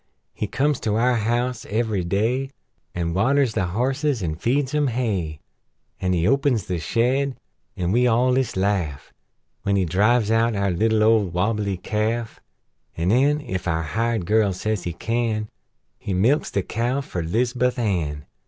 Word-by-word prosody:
He 105 - -3
comes 145 +5 0
to 105 -2 -1
our 125 +3 +3
house 120 +2 -1
every 110 -3 0
day, 115 +9 0 0.5
An' 85 -1 -1
waters 130 +5 +2
the 95 - 0
horses, 130 - 0
an' 80 -2 -1
feeds 130 - 0
'em 150 -1 +2
hay; 100 - -2 0.6
An' 90 0 0
he 85 -1 +1
opens 135 -3 +2
the 90 -2 -2
shed 130 - 0 0.4
an' 90 0 -1
we 125 +3 +3
all 125 +2 +3
ist 130 -7 0
laugh 95 -7 -1 0.5
When 100 - 0
he 95 -2 +2
drives 105 +6 +2
out 115 0 +2
our 100 -1 +1
little 110 +4 +2
old 110 -5 +3
wobble 105 +3 0
ly 100 -1 -1
calf; 110 +4 -2 0.6
An' 85 +2 0
nen 145 +6 +3
ef 95 0 -4
our 80 -1 0
hired 115 +3 -1
girl 105 0 +2
says 105 +1 -2
he 85 - -2
can 110 +1 -1 0.5
He 95 - -3
milks 120 +11 +2
the 100 - -1
cow 120 +7 -1
fer 90 -9 -4
'Lizabuth 120 +8 0
Ann. 85 -11 -1
110 Hz, 165 wpm, -23 LUFS, 95-125 Hz, 0.6 s, our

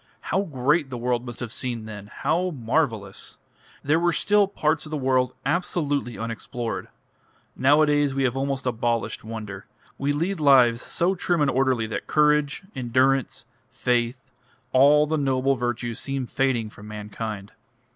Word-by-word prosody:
How 190 - +3
great 145 -2 +1
the 125 - -5
world 120 +1 -1
must 120 0 -8
have 120 -3 -4
seemed 120 -4 -4
then! 105 -2 -8
How 180 +2 0
marvellous! 115 - -2 0.5
They 150 +3 +3
were 175 +1 +2
still 205 +2 +3
parts 155 -5 -1
of - - -10
the 155 - -2
world 130 -2 +1
absolutely 145 - -1
unexplored. 115 +1 -4 0.7
Nowadays 145 0 +3
we 135 - +1
have 130 -1 +1
almost 135 0 -2
abolished 120 -1 -1
wonder, 105 -3 -7 0.3
we 140 +1 +1
lead 170 +6 -1
lives 130 -5 +5
so 175 +3 0
trim 175 -2 0
and 145 - +3
orderly 130 -3 +1
that 110 - -5
courage, 150 +1 +2
endurance, 130 +1 +1 0.2
faith, 125 0 -1 0.4
all 145 +3 +6
the 155 0 -1
noble 135 -1 +2
virtues 120 -2 -3
seem 135 -2 -3
fading 120 -4 0
from 105 0 -12
mankind." 105 -1 -6
130 Hz, 145 wpm, -24 LUFS, 120-150 Hz, 0.7 s, all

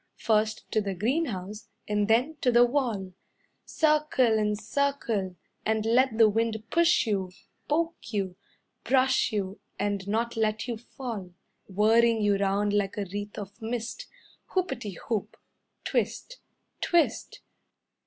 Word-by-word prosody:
First 215 -1 +1
to 215 - +2
the 200 -2 -3
greenhouse 215 - -2 0.2
and 210 -1 +1
then 250 +8 +2
to 250 - +3
the 240 0 +6
wall 235 -8 -1 0.5
Circle 300 -7 +2
and 210 -1 0
circle, 225 -7 -1 0.3
And 220 0 0
let 240 +1 +3
the 225 -1 +7
wind 220 0 0
push 340 -2 +4
you, 195 -4 -1 0.4
Poke 330 -3 -1
you, 195 -4 -2 0.5
Brush 260 +1 +3
you, 200 -2 -3 0.2
And 200 -1 -2
not 230 +3 -1
let 220 +1 0
you 240 - -2
fall. 220 -6 -7 0.3
Whirring 225 +4 +4
you 205 -1 +3
round 200 +1 +1
like 205 -1 0
a 205 - -1
wreath 205 0 -5
of 200 +2 -8
mist. 235 - -4 0.5
Hoopety 235 - -1
hoop, 215 -2 -2 0.5
Twist, - - -2 0.4
Twist." 340 -3 +1
220 Hz, 130 wpm, -28 LUFS, 205-250 Hz, 0.5 s, the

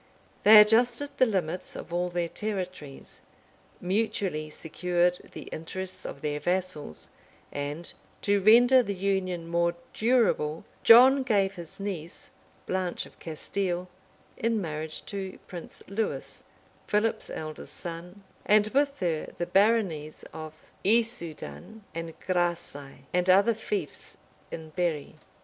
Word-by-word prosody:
They 215 +1 +10
adjusted 240 +6 +4
the 255 - +6
limits 185 -4 -2
of 170 - -8
all 175 +1 0
their 175 -1 -1
territories; 185 -8 -6 0.6
mutually 185 -5 -1
secured 175 +3 0
the - - -7
interests 185 +4 -5
of 140 - -8
their 150 -1 -2
vassals, 175 - -3 0.4
and, 145 +4 -5 0.3
to 200 -1 +2
render 245 +5 +7
the 200 -4 -3
union 185 -3 -1
more 170 0 +1 0.2
durable, 215 -10 +2 0.2
John 260 +4 +8
gave 200 -6 +2
his 175 -1 -10
niece, 180 -5 -6 0.3
Blanche 185 -1 -2
of - - -18
Castile, 180 +2 -3 0.5
in 230 -1 +1
marriage 155 -3 -4
to 195 -2 -5
Prince 175 -3 -9
Lewis, 215 +3 -3 0.5
Philip's 210 +2 0
eldest 155 -1 -7
son, 175 +3 -8 0.2
and 210 0 +4
with 280 +1 +1
her 165 -4 -1
the 175 - -1
baronies 185 -5 +1
of 155 -1 -7 0.3
Issoudun 220 -1 -1
and 165 -1 -6
Graçai, 175 -6 -2
and 180 +1 +1
other 200 +5 +6
fiefs 205 -7 -4 0.3
in 160 -1 -8
Berri. 165 -3 -2
180 Hz, 120 wpm, -28 LUFS, 165-210 Hz, 0.6 s, They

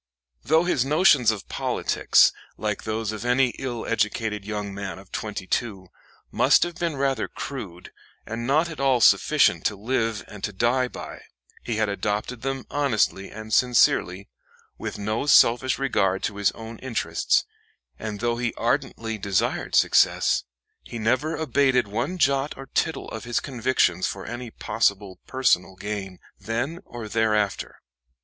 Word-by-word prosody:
Though 160 +7 +3
his 175 -8 +1
notions 145 - +4
of 110 -3 -2
politics, - - +2 0.3
like 105 -1 -3
those 110 0 -2
of 110 +1 -6
any 125 +1 +3
ill 120 -3 -4
educated 105 -2 -1
young 105 -2 -4
man 100 -1 -5
of 95 0 -15
twenty 105 -3 -4
two, 95 -3 -3 0.4
must - - +4
have 175 - -3
been 170 -2 -2
rather 135 -4 0
crude, 100 -11 -7 0.3
and 115 +2 -5
not 155 +5 +3
at 160 -4 -8
all 135 -2 +3
sufficient - - +4
to - - +1
live 115 0 -1
and 100 -2 -11
to 105 - -1
die 120 +5 +1
by, - - -9 0.4
he 115 - -3
had 110 0 +1
adopted 105 +4 -3
them 135 0 -3
honestly 115 -8 0
and 110 +1 -8
sincerely, 100 -6 +3 0.5
with - - -6
no 110 +6 -2
selfish 130 -1 +5
regard 100 -8 0
to 100 - -2
his 100 -1 +3
own 115 0 -9
interests; 130 -3 0 0.5
and 110 -1 -5
though 120 0 0
he 120 -1 -2
ardently 115 -3 -2
desired 100 -1 -1
success, - - +3 0.4
he 120 - -8
never 130 +8 0
abated 130 -5 +2
one 140 - -2
jot 140 -2 +1
or 135 - -8
tittle 160 - -1
of 110 - -7
his 120 0 0
convictions 130 -6 +1
for 95 - -6
any 120 +1 -6
possible 100 -4 -1
personal 95 -8 +1
gain, 95 -2 -5 0.2
then 120 +9 -3
or 120 -2 -8
thereafter. 105 -2 -1
115 Hz, 150 wpm, -24 LUFS, 105-130 Hz, 0.5 s, selfish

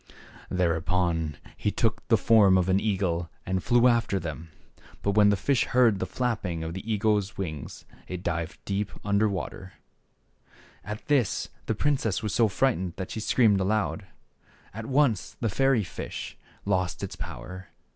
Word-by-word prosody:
Thereupon 85 -2 0 0.2
he - - -1
took - - 0
the - - +5
form 105 -4 +5
of 90 -1 +1
an 95 +1 +4
eagle 90 -5 -1 0.2
and 95 -1 -1
flew 120 +1 +4
after 115 -5 +2
them. 80 -1 -6 0.5
But 100 - +2
when 105 0 +5
the 100 - +4
fish 135 +7 +1
heard 120 -6 +3
the - - -2
flapping 100 -10 -2
of 80 +1 -4
the 95 +5 -5
eagle's 105 -1 +1
wings, 80 -8 -6 0.2
it 90 0 -6
dived 85 -1 -2
deep 100 +1 -2
under 100 +1 +3
the 100 - -1
water. 95 0 -6 1.1
At 105 +2 -6
this 140 -8 +1 0.2
the 110 - 0
princess 115 -5 0
was 105 -3 -2
so 115 +1 +4
frightened 100 -5 0
that 95 -1 -6
she - - -4
screamed 110 -2 +3
aloud. 105 0 -1 0.7
At 110 +2 -6
once 130 -6 +1
the 115 - 0
fairy 135 +1 +2
fish 90 - -6 0.3
lost 90 -4 0
its - - -5
power. 90 +9 -8
100 Hz, 160 wpm, -27 LUFS, 90-110 Hz, 1.1 s, the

